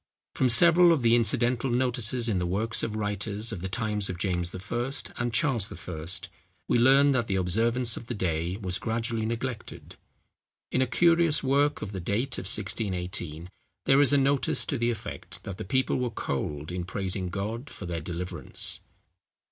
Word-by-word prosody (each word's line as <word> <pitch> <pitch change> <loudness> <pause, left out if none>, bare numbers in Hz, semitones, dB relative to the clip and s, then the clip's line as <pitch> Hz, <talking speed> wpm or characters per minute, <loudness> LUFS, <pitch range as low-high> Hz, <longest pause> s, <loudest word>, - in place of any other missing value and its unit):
From 130 - +2
several 170 +6 +6
of 150 -7 +2
the 115 0 +4
incidental 120 +2 +2
notices 120 -1 +2
in 100 -5 0
the 90 - -1
works 110 +6 0
of 110 - -3
writers 105 +1 -2
of 100 -6 -5
the 95 - -4
times 105 -1 -2
of 90 - -4
James 90 -2 -1
I. 120 +7 -3 0.3
and 120 0 -1
Charles 115 -3 0
I., 80 -3 -7 0.6
we - - +2
learn 135 +3 +5
that 125 -4 0
the 95 - -1
observance 115 +6 +1
of 115 - -9
the 120 - -4
day 85 -1 -1
was 95 -3 -2
gradually 115 -1 -2
neglected. 115 0 -5 0.7
In 130 - +1
a 130 - +2
curious 165 +1 +3
work 140 +2 +1
of 105 - -5
the 95 - -5
date 110 +9 -1
of - - -7
1618, 90 -5 -1 0.4
there 135 +1 +5
is 145 - +4
a 145 - +5
notice 140 0 +1
to 140 - -2
the 120 0 +1
effect 100 -4 -6
that 100 -3 -7
the - - -3
people 130 +5 0
were 125 -1 -1
cold 75 -6 -4
in 90 0 -3
praising 95 0 -2
God 110 +8 -4
for - - -8
their 85 -2 -4
deliverance. 90 +1 -3
110 Hz, 180 wpm, -27 LUFS, 95-125 Hz, 0.7 s, several